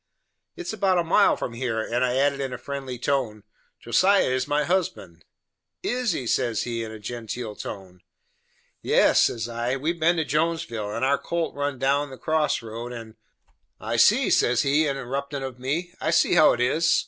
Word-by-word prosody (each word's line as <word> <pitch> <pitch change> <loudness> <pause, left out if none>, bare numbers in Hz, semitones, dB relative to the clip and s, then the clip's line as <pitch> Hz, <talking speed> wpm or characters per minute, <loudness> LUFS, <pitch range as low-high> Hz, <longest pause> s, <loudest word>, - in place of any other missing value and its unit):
"It - - -7
is - - -4
about 195 -3 +1
a 175 - +2
mile 180 +5 +4
from 120 - -4
here," 115 -2 -2
and 120 +3 -1
I 125 0 +1
added 140 +1 +2
in 135 -1 -3
a - - -4
friendly 135 -1 -6
tone, 120 -5 -1 0.4
"Josiah 185 - +3
is 130 0 -1
my 145 +1 +1
husband." 120 - -2 0.6
"Is 245 -2 0
he?" 130 - -4
says 120 -1 0
he, 115 -1 -3
in 110 - -7
a 110 - -8
genteel 115 0 -6
tone. 95 -4 -8 0.8
"Yes," - - +4
says 115 -1 -2
I, 120 +2 -2
"we 145 +5 -1
have 170 - -9
been 170 +2 +3
to 160 -2 -1
Jonesville, 150 -9 -1
and 115 +4 -1
our 140 +1 +2
colt 170 -1 -2
run 145 -1 -2
down 140 +3 +1
that 130 - -12
cross 155 -5 0
road, 115 +2 -7
and 115 -2 -8 0.4
" - - -46 0.2
"I - - -3
see," - - +4
says 125 0 +3
he 145 +3 +2
interruptin' 140 +1 -4
of 130 -2 -6
me, 160 +8 -3
"I - - 0
see 165 - +3
how 160 -3 +6
it 120 - -4
is." 155 +7 +2
135 Hz, 195 wpm, -25 LUFS, 120-155 Hz, 0.8 s, how